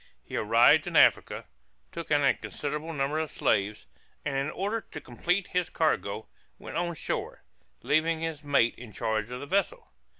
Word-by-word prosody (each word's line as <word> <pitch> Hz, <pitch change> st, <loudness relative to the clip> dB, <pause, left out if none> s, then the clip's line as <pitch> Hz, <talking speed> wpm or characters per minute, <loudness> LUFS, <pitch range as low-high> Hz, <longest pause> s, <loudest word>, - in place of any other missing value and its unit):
He -, -, -8 dB
arrived 115 Hz, +3 st, +5 dB
in -, -, -4 dB
Africa, -, -, +4 dB, 0.5 s
took 170 Hz, -1 st, -7 dB
in 145 Hz, -1 st, +3 dB
a 140 Hz, -, +5 dB
considerable 150 Hz, +3 st, -5 dB
number 145 Hz, 0 st, -1 dB
of 160 Hz, -1 st, -2 dB
slaves, 105 Hz, -, 0 dB, 0.4 s
and 145 Hz, -2 st, -1 dB
in 135 Hz, +2 st, 0 dB
order 205 Hz, +7 st, -2 dB
to -, -, -9 dB
complete 180 Hz, +10 st, -1 dB
his 180 Hz, -1 st, 0 dB
cargo, 110 Hz, -9 st, 0 dB, 0.3 s
went -, -, -9 dB
on 175 Hz, 0 st, -1 dB
shore, -, -, -4 dB, 0.4 s
leaving 160 Hz, +1 st, +2 dB
his 160 Hz, -2 st, -4 dB
mate 140 Hz, -5 st, +3 dB
in 120 Hz, -2 st, -10 dB
charge 110 Hz, 0 st, -1 dB
of 125 Hz, 0 st, -5 dB
the -, -, -6 dB
vessel. 200 Hz, -, -1 dB
150 Hz, 170 wpm, -28 LUFS, 120-165 Hz, 0.5 s, arrived